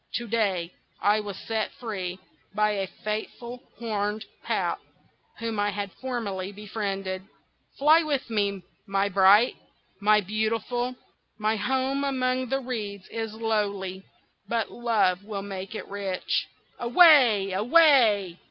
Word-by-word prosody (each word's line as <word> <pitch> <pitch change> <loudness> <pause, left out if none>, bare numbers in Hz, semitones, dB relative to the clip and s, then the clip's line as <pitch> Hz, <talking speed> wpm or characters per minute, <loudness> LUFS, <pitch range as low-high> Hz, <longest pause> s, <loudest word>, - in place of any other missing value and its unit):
To 240 - -2
day 195 -6 0 0.3
I 210 +1 +3
was 205 -2 -6
set 220 -1 -2
free 190 -6 -4 0.4
by 210 0 +3
a 195 -2 -2
faithful 235 +5 -5 0.2
Horned 210 -2 -2 0.2
Pout, - - -1 0.6
whom 225 -2 -3
I 205 0 +2
had 200 -1 -4
formerly 205 -7 -4
befriended. 195 -2 -4 0.6
Fly 310 +4 +6
with 290 -4 -1
me, 200 -4 -1 0.2
my 195 0 +1
bright, 200 +5 +6 0.5
my 210 +1 +5
beautiful! 225 +5 -1 0.4
My 215 +1 +1
home 265 +5 0
among 255 -2 0
the 270 +1 0
reeds 210 -6 -5
is 225 -1 -4
lowly, 200 -4 -1 0.5
but 230 0 -1
love 210 -6 +1
will 200 -2 -5
make 195 +1 -6
it - - -6
rich. 195 -2 -2 0.3
Away! 240 - +6
away!" 215 - +4
215 Hz, 125 wpm, -26 LUFS, 200-240 Hz, 0.6 s, Fly